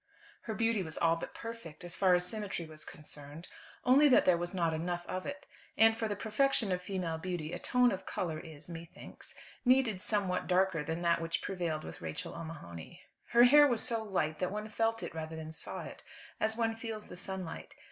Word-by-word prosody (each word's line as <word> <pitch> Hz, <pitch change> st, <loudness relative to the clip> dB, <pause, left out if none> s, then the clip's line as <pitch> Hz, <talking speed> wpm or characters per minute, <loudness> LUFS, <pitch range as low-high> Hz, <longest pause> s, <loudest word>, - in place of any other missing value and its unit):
'" -, -, -24 dB
Her 220 Hz, -, -3 dB
beauty 225 Hz, -1 st, +2 dB
was 160 Hz, -3 st, -6 dB
all 165 Hz, 0 st, +4 dB
but 165 Hz, -, -7 dB
perfect, 230 Hz, -9 st, -8 dB
as 175 Hz, -1 st, -6 dB
far 185 Hz, -2 st, +5 dB
as 180 Hz, 0 st, +1 dB
symmetry 200 Hz, -4 st, -3 dB
was 155 Hz, -1 st, -10 dB
concerned, 150 Hz, +2 st, -9 dB, 0.4 s
only 275 Hz, +4 st, +7 dB
that 255 Hz, -, +6 dB
there 180 Hz, -, +6 dB
was 175 Hz, +1 st, -3 dB
not 170 Hz, -4 st, +1 dB
enough 175 Hz, +2 st, -2 dB
of 185 Hz, 0 st, -4 dB
it; 285 Hz, 0 st, -6 dB, 0.3 s
and 225 Hz, 0 st, +7 dB
for 225 Hz, 0 st, -1 dB
the 205 Hz, -, -2 dB
perfection 220 Hz, +1 st, +2 dB
of 180 Hz, 0 st, 0 dB
female 180 Hz, -4 st, -2 dB
beauty 175 Hz, -2 st, -3 dB
a -, -, -3 dB
tone 250 Hz, -1 st, +4 dB
of 190 Hz, -, -5 dB
colour 160 Hz, -3 st, -2 dB
is, 155 Hz, -2 st, -10 dB
methinks, 170 Hz, -1 st, -9 dB, 0.3 s
needed 250 Hz, -6 st, +4 dB
somewhat 195 Hz, -3 st, 0 dB
darker 185 Hz, -3 st, +3 dB
than 160 Hz, +3 st, -3 dB
that 170 Hz, 0 st, +3 dB
which 165 Hz, 0 st, -2 dB
prevailed 170 Hz, -5 st, -2 dB
with -, -, -8 dB
Rachel 80 Hz, -2 st, -5 dB
O'Mahony. 160 Hz, -, -8 dB, 0.2 s
Her 235 Hz, +1 st, +6 dB
hair 290 Hz, +4 st, +8 dB
was 240 Hz, -5 st, 0 dB
so 230 Hz, -2 st, 0 dB
light 155 Hz, -7 st, -1 dB
that 180 Hz, -, 0 dB
one 210 Hz, +1 st, -4 dB
felt 225 Hz, +1 st, 0 dB
it -, -, -5 dB
rather 160 Hz, 0 st, -5 dB
than 160 Hz, 0 st, -6 dB
saw 160 Hz, -, -6 dB
it, -, -, -9 dB, 0.4 s
as 220 Hz, +1 st, +1 dB
one 225 Hz, -1 st, +1 dB
feels 225 Hz, -2 st, -5 dB
the -, -, -10 dB
sunlight. 190 Hz, -2 st, -5 dB
180 Hz, 210 wpm, -33 LUFS, 165-220 Hz, 0.4 s, hair